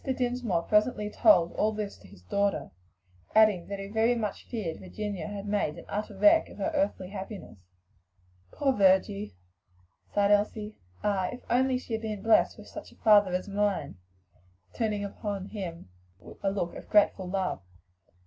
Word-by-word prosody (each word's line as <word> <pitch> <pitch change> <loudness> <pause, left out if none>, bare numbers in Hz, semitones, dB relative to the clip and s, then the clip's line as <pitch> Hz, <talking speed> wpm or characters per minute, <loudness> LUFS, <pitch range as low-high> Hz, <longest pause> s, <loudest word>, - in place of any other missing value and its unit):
Dinsmore 245 - -1
presently 210 0 +1
told 175 - +5
all 215 - +1
this 210 -1 -4
to 95 - -16
his 90 -1 -17
daughter, 200 - -1 0.6
adding 215 -5 +5
that 200 - -4
he 195 - -6
very 220 +4 +2
much 215 -4 -4
feared 200 -9 -4
Virginia 205 +1 -5
had 205 -1 -6
made 205 -7 -1
an - - -10
utter 210 -1 -4
wreck 315 +5 +5
of - - -13
her 320 - -1
earthly 285 -11 -1
happiness. 195 - -8 0.9
"Poor 275 -2 +1
Virgie!" 195 - +2 0.8
sighed 205 0 +2
Elsie. 210 +1 +1 0.3
"Ah! 195 -3 +1
if 245 - -8
only 255 +1 +3
she 250 -2 -7
had 220 - -1
been 215 -3 -5
blest 225 - +4
with - - -12
such - - -9
a - - -19
father 205 -3 +5
as 185 - -3
mine!" 200 - -1 0.7
turning 215 -3 -1
upon 200 -1 -5
him 170 - -7 0.5
a 195 - +1
look 190 -3 -2
of - - -10
grateful 200 -3 +3
love. 185 - -2
205 Hz, 160 wpm, -28 LUFS, 190-220 Hz, 0.9 s, told